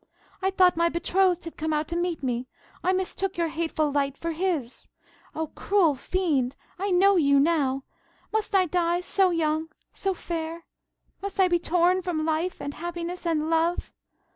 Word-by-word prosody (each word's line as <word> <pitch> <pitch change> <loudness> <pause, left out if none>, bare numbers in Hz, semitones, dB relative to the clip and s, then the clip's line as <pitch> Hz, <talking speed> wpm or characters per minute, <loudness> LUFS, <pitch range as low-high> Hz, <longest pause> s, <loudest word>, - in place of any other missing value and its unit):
"I 380 - +2
thought 370 -2 +4
my 335 +1 +3
betrothed 360 +1 +1
had 330 - -8
come 315 0 -1
out 300 0 0
to 340 - -2
meet 345 -3 -1
me. 250 -1 -1 0.4
I 370 - +3
mistook 375 +1 -2
your 335 -1 +1
hateful 315 -2 -1
light 280 -1 0
for 335 - -3
his. 325 -7 -2 0.5
Oh, 320 -1 -3
cruel 385 -7 +3
fiend, 280 -3 0 0.2
I 400 +2 -1
know 385 +2 +5
you 280 -4 +4
now! 275 -3 +2 0.5
Must 435 -1 0
I 375 -1 +5
die 350 0 +1
so 380 +1 +2
young, 320 -1 0 0.2
so 385 -1 -1
fair? 330 -1 -5 0.6
Must 395 0 -5
I 380 - +6
be 350 -1 +2
torn 355 +2 +2
from 335 -4 -2
life, 325 +3 -1
and 285 - -5
happiness, 345 +2 -5
and 315 -2 +1
love? 330 +2 +1
335 Hz, 170 wpm, -26 LUFS, 310-365 Hz, 0.6 s, I